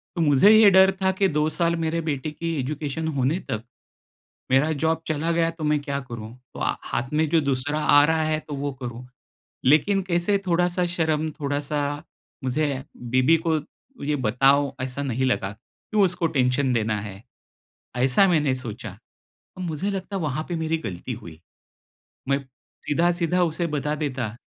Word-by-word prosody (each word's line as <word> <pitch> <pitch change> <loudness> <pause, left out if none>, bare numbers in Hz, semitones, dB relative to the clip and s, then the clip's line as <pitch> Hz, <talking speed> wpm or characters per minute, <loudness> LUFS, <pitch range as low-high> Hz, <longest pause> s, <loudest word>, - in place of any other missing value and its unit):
तो 170 - -1
मुझे 150 +5 +5
ये 220 -1 +8
डर 190 0 +7
था 190 0 +3
कि, 195 +1 +2
"2 150 -3 +1
साल 170 +1 +1
मेरे 165 0 -1
बेटे 155 -1 -3
की 165 +2 -4
एजुकेशन 150 +3 -3
होने 135 +7 +1
तक, 110 0 -2 0.9
मेरा 135 +4 +4
जॉब 160 0 +1
चला 155 +1 0
गया, 165 0 +2
तो 165 -1 -9
मैं 150 0 +2
क्या 140 -1 -3
करूँ?" 115 -1 -7 0.2
तो - - -7
आ - - 0
हाथ 130 - -3
में 155 +1 +2
जो 165 +1 +3
दूसरा 140 +1 -1
आ 145 -1 +6
रहा 160 0 +1
है, 155 0 0
तो 150 -2 -7
वो 140 +1 -3
करूँ। 120 0 -6 0.6
लेकिन 155 +9 +4
कैसे 180 +2 +1
थोड़ा-सा 180 +1 +2
शर्म, 160 -2 0
थोड़ा-सा 145 0 -1 0.6
मुझे, 135 0 -1
बीवी 130 +6 +3
को 160 -1 +2 0.5
ये 150 +1 +1
बताऊँ, 135 +4 +3
ऐसा 130 +2 -3
नहीं 130 -1 -1
लगा। 100 -6 0
"क्यों 205 - -3
उसको 180 -2 +1
टेंशन 130 -2 +1
देना 110 -2 0
है?" 100 0 -9 0.7
ऐसा 130 +10 +4
मैंने 150 -6 +2
सोचा। 120 -3 -6 0.7
अब 185 - -6
मुझे 175 +4 -2
लगता 195 0 -5
है, - - -3
वहाँ 150 +1 -2
पे 175 - -1
मेरी 160 0 -1
गलती 95 +7 -5
हुई। 85 -8 -11 0.9
मैं 140 0 +2 0.5
सीधा-सीधा 175 +3 +1
उसे 170 0 -1
बता 150 +1 -1
देता। 130 -7 -3
150 Hz, 170 wpm, -24 LUFS, 130-165 Hz, 0.9 s, ये